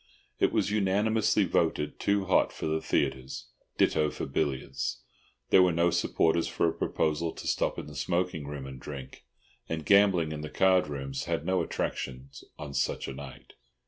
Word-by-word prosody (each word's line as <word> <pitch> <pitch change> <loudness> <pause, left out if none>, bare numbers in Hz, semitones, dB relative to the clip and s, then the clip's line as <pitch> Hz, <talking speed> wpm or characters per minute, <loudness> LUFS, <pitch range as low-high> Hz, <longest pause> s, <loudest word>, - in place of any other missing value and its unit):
It - - +3
was - - +1
unanimously 105 +2 +2
voted 75 0 0
too 100 -1 +1
hot 95 - +3
for - - -6
the 80 0 0
theatres, 65 -2 -2 0.3
ditto 75 -1 +3
for - - -5
billiards. 70 -1 -2 0.5
There 95 - +8
were 90 -1 +5
no 85 +1 +2
supporters 85 -1 +2
for - - +1
a 80 - 0
proposal 80 +1 0
to - - -9
stop - - 0
in - - -5
the 75 - -10
smoking 85 +1 -1
room 70 -2 -6
and 65 -1 -8
drink, 70 -2 -9 0.4
and 80 -2 -3
gambling 100 -6 +4
in 75 -1 -5
the 75 - -5
card 95 -3 +3
rooms 70 -2 -4
had - - -2
no 95 0 +2
attractions 65 +1 -4
on 70 -1 -7
such 70 - -1
a - - -5
night. 70 0 -10
80 Hz, 175 wpm, -29 LUFS, 70-90 Hz, 0.5 s, There